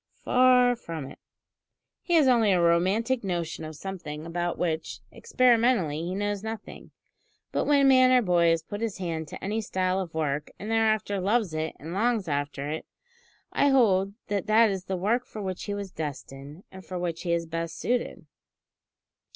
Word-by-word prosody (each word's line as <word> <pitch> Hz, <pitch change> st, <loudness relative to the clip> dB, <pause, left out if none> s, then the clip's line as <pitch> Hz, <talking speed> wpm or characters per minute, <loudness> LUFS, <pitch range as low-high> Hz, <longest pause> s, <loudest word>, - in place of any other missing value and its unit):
Far 250 Hz, -1 st, +5 dB
from 165 Hz, -, -7 dB
it. -, -, -14 dB, 0.8 s
He 345 Hz, -, 0 dB
has 305 Hz, -4 st, +5 dB
only 230 Hz, -5 st, +4 dB
a 185 Hz, -, +3 dB
romantic 190 Hz, +9 st, +2 dB
notion 170 Hz, -4 st, -3 dB
of 155 Hz, 0 st, -7 dB
something 160 Hz, -3 st, -7 dB
about 175 Hz, +1 st, -2 dB
which, 160 Hz, -2 st, -2 dB
experimentally, 235 Hz, -, +2 dB
he 175 Hz, +3 st, -3 dB
knows 205 Hz, 0 st, -2 dB
nothing; 220 Hz, 0 st, -8 dB, 0.6 s
but, -, -, 0 dB
when 285 Hz, -2 st, +4 dB
man 255 Hz, -1 st, +6 dB
or 250 Hz, -1 st, +5 dB
boy 175 Hz, -3 st, +3 dB
has 165 Hz, -1 st, +1 dB
put 205 Hz, +5 st, -7 dB
his 225 Hz, -3 st, -2 dB
hand 165 Hz, -4 st, -4 dB
to -, -, -10 dB
any 210 Hz, +3 st, -1 dB
style 185 Hz, -2 st, -1 dB
of 175 Hz, -4 st, -6 dB
work, 150 Hz, -2 st, -1 dB
and 215 Hz, +2 st, -6 dB
thereafter 215 Hz, -2 st, +1 dB
loves 200 Hz, -1 st, +1 dB
it 155 Hz, 0 st, -3 dB
and 160 Hz, +4 st, -7 dB
longs 220 Hz, -1 st, 0 dB
after 145 Hz, -1 st, -2 dB
it, 160 Hz, -, -5 dB, 0.7 s
I 285 Hz, -, +3 dB
hold 200 Hz, -7 st, +3 dB
that 200 Hz, -3 st, -2 dB
that 220 Hz, 0 st, +5 dB
is 190 Hz, -1 st, -4 dB
the 190 Hz, -1 st, -2 dB
work 220 Hz, +7 st, +1 dB
for 220 Hz, -, -9 dB
which 190 Hz, -3 st, -4 dB
he 205 Hz, -, -3 dB
was 200 Hz, -2 st, -6 dB
destined, 145 Hz, +1 st, -7 dB
and 190 Hz, 0 st, -11 dB
for 185 Hz, -, -6 dB
which 170 Hz, -2 st, -3 dB
he 175 Hz, -, -2 dB
is 170 Hz, 0 st, 0 dB
best 165 Hz, 0 st, -4 dB
suited." 240 Hz, +7 st, -2 dB
190 Hz, 180 wpm, -27 LUFS, 165-225 Hz, 0.8 s, man